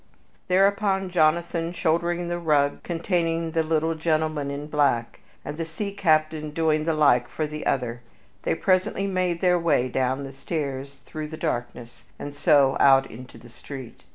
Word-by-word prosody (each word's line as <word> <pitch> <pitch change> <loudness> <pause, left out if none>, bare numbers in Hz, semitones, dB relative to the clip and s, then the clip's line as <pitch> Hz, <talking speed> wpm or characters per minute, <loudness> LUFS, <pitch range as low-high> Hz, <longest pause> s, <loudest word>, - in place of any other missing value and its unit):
Thereupon, 195 0 +2
Jonathan 170 0 +1
shouldering 170 +1 0
the 175 0 -2
rug 145 -4 +1
containing 165 -1 -1
the 165 0 +1
little 160 0 0
gentleman 155 -2 -1
in 140 +1 -5
black, 140 -6 0 0.3
and 145 - -5
the 165 - -2
sea 180 +5 -5
captain 155 -5 +1
doing 155 0 0
the 165 -1 +1
like 140 -5 +4
for 155 - -3
the 150 0 -5
other, 120 -3 -1 0.4
they - - 0
presently 190 +1 +1
made 185 -3 -1
their 180 -1 +3
way 150 -7 +1
down 130 +2 -1
the 135 0 -8
stairs 140 -2 -5
through 155 -1 -6
the 160 +1 -8
darkness, 120 -4 -4
and 145 - -7
so 140 -2 +3
out 135 -1 +5
into 125 +3 -11
the 120 - -14
street. 130 +1 -10
155 Hz, 160 wpm, -25 LUFS, 140-170 Hz, 0.4 s, out